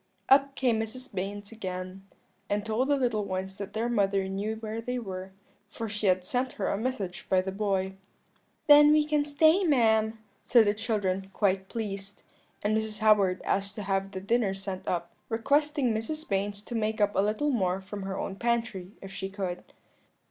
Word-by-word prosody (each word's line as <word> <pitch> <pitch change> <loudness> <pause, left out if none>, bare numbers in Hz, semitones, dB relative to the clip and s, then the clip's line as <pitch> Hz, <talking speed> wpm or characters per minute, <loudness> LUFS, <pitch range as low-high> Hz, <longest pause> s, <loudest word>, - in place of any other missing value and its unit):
"Up 275 0 +5
came 240 -4 +2
Mrs. 240 +4 -5
Baynes 200 +2 -4
again, 185 -2 -6 0.4
and 205 +1 0
told 220 +4 0
the 285 - +3
little 240 -6 0
ones 190 0 -4
that 200 -1 -6
their 225 +2 -1
mother 200 -4 +1
knew 200 +3 -2
where 220 0 -5
they 250 +2 -3
were, 190 -4 -6 0.4
for 225 +1 -5
she 210 -1 -2
had 185 -1 +3
sent 250 +6 -1
her 200 - -2
a - - +1
message 210 -5 -3
by 190 - +4
the 190 +1 -2
boy. 195 -1 -1 0.7
"'Then 295 0 +8
we 305 -1 +4
can 300 -1 +2
stay, 315 +6 +4
ma'am,' 225 -7 +3 0.3
said 235 -3 +5
the 205 - +3
children, 205 -4 -1
quite 190 -2 +1
pleased: 200 -3 -5 0.4
and 210 +1 +2
Mrs. 220 -1 -1
Howard 205 -4 +3
asked 200 +1 -1
to 210 - -5
have 195 0 0
the 190 -1 -6
dinner 205 -1 +1
sent 195 -1 -6
up, 170 -1 -2 0.2
requesting 280 +2 +2
Mrs. 305 +9 -3
Baynes 200 +1 -1
to 240 - -8
make 220 -1 -1
up 205 0 +3
a - - +2
little 215 +9 +1
more 190 -6 +1
from 195 +1 -7
her 190 0 -4
own 195 - -4
pantry, 225 -5 -1
if 195 - -8
she 190 - -4
could. 190 -3 -4
210 Hz, 185 wpm, -28 LUFS, 195-235 Hz, 0.7 s, Then